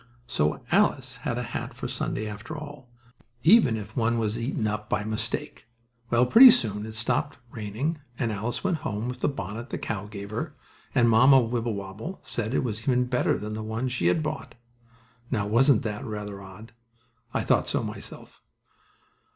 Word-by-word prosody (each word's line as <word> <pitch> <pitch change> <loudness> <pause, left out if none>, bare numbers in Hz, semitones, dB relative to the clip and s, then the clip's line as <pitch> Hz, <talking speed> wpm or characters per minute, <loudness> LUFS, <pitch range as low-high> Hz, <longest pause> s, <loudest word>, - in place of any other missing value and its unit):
So 75 -9 0
Alice - - +2
had - - -3
a - - -2
hat - - -5
for - - -4
Sunday 110 - -3
after 110 +10 -7
all, 145 -4 -9 0.5
even 160 - +6
if 105 0 -8
one 115 -1 +1
was 110 -1 0
eaten 115 -2 -2
up 105 0 -2
by - - 0
mistake. 110 0 -3 0.4
Well, 120 +1 +4
pretty 245 - +10
soon 105 - +2
it 110 - -8
stopped 120 +5 -1
raining 115 +9 -3 0.2
and 115 -3 0
Alice 110 +4 -3
went 185 -4 +1
home 110 -4 -3
with 125 - -5
the - - +1
bonnet 115 -1 -5
the - - -3
cow 105 -2 -4
gave 100 -1 -8
her, 110 - -4 0.4
and 120 - +5
Mamma 130 +4 +7
Wibblewobble 115 - -3
said 120 +2 -3
it - - +2
was 110 -3 -3
even 125 0 +2
better 125 0 +1
than 105 +1 -5
the 110 - -4
one 110 +4 -2
she 125 -9 0
had 155 - +2
bought. 150 -5 -5 0.7
Now, 105 -6 0
wasn't 120 +4 +4
that 105 -2 -3
rather 105 -2 -5
odd? 100 +4 -12 0.6
I - - 0
thought - - +2
so, - - 0
myself. - - -9
115 Hz, 175 wpm, -27 LUFS, 105-125 Hz, 0.7 s, pretty